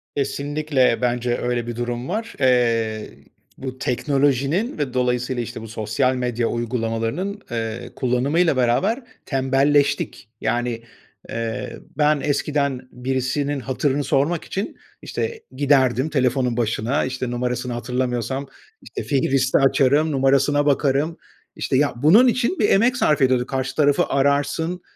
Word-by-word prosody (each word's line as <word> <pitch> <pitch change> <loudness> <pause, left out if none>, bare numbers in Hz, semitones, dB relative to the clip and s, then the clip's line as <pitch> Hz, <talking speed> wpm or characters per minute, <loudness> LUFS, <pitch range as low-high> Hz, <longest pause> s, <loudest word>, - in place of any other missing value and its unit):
Kesinlikle, 140 -3 0
bence 120 0 0
öyle 120 -1 -2
bir 120 - -4
durum 120 +1 -3
var. 225 +4 -3
Eee, 115 -4 +1 0.4
bu 130 -1 -6
teknolojinin 140 - 0
ve 140 -4 -2
dolayısıyla, 125 0 0
işte, 115 - -7
bu 115 - -8
sosyal 115 +4 0
medya 120 -2 -1
uygulamalarının, 120 - -2
eee, 115 0 -4
kullanımıyla 140 +6 +1
beraber 190 - +1 0.2
tembelleştik. 135 -2 +1
Yani, 120 -1 -1 0.5
eee, 115 +2 -4 0.2
ben 150 -1 +3
eskiden 140 -3 -1
birisinin 130 +3 -1
hatırını 135 +2 -1
sormak 145 +6 +1
için, 195 +2 -4 0.2
işte, 455 -1 -4
giderdim 135 -1 +2
telefonun 130 -4 +1
başına, 120 +4 0
işte, 130 -1 -3
numarasını 125 0 -2
hatırlamıyorsam, 125 +2 -2 0.3
işte, - - -7
fihristi 135 -2 +2
açarım, 140 +3 +3
numarasına 140 +1 +2
bakarım, 145 +3 +1 0.4
işte, 130 - 0
ya, 145 +1 +2
bunun 165 - +6
için 250 +8 +1
bir 205 - +3
emek 240 +5 +3
sarf 150 - +2
ediyorduk. 130 -2 +2
Karşı 135 0 -2
tarafı 145 -2 +3
ararsın, 145 +5 0
130 Hz, 125 wpm, -22 LUFS, 125-145 Hz, 0.5 s, bunun